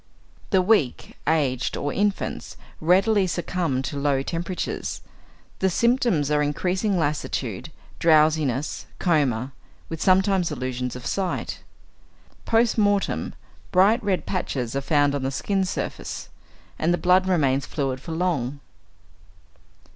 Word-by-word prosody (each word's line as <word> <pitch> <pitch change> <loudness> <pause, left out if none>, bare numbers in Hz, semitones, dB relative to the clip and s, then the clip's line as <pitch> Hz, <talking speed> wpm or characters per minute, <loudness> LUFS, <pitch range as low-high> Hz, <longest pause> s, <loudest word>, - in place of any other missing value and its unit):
= - - -29
The 185 - +4
weak, 180 - +1
aged, 140 -6 +1
or 145 0 -2
infants, 205 0 -2 0.2
readily 190 +4 +3
succumb 170 -6 -1
to 140 +1 -4
low 140 -1 +1
temperatures. 175 +4 -4 0.6
The 190 - +2
symptoms 235 - +2
are 150 0 +3
increasing 185 +7 0
lassitude, 150 -2 -2 0.3
drowsiness, 155 -4 +2
coma, 140 -8 +1 0.4
with 165 -1 -5
sometimes 190 -2 +3
illusions 125 -2 -3
of 125 - -8
sight. 190 -2 -2 0.9
Post 230 0 +2
mortem, 205 -1 +1 0.4
bright 200 +5 +4
red 195 -3 0
patches 135 -10 -2
are 140 - 0
found 145 0 +2
on 140 - -2
the 130 - -1
skin 190 +9 -1
surface, - - -5 0.5
and 165 - +2
the 175 - +2
blood 185 +1 +3
remains 140 -7 +2
fluid 135 -3 -2
for 165 - -8
long. 150 -6 -1
160 Hz, 125 wpm, -24 LUFS, 140-190 Hz, 0.9 s, The